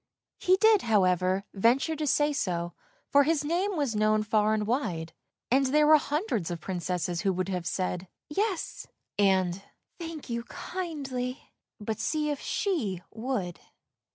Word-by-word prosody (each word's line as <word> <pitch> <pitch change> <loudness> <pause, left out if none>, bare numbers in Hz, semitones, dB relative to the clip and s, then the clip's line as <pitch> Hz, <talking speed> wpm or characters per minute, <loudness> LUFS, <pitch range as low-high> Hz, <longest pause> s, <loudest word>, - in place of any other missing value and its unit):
He 370 +1 +4
did, 435 0 +5
however, 185 -3 +2
venture 245 +10 +2
to 305 0 -2
say 295 +2 +3
so, 175 -8 -2 0.4
for 285 - +7
his 300 0 +1
name 360 +5 0
was 275 -7 0
known 215 0 +3
far 215 0 +2
and 210 -1 -1
wide; 175 - -2 0.4
and 270 +1 +4
there 300 +3 +4
were 310 +1 +8
hundreds 290 - -1
of 170 -1 -4
Princesses 175 -1 -2
who 195 - +2
would 185 +1 -2
have 180 -2 -2
said 185 0 -2
" - - -64
Yes," 390 +2 -2 0.3
and 190 -2 +3 0.2
" - - -46
Thank 330 -3 -6
you, 235 -1 -3
kindly," 275 -8 -5 0.3
but 215 0 -3
see 300 -1 0
if 285 - -3
she 225 - -1
would! 220 -7 -3
235 Hz, 155 wpm, -28 LUFS, 185-300 Hz, 0.4 s, were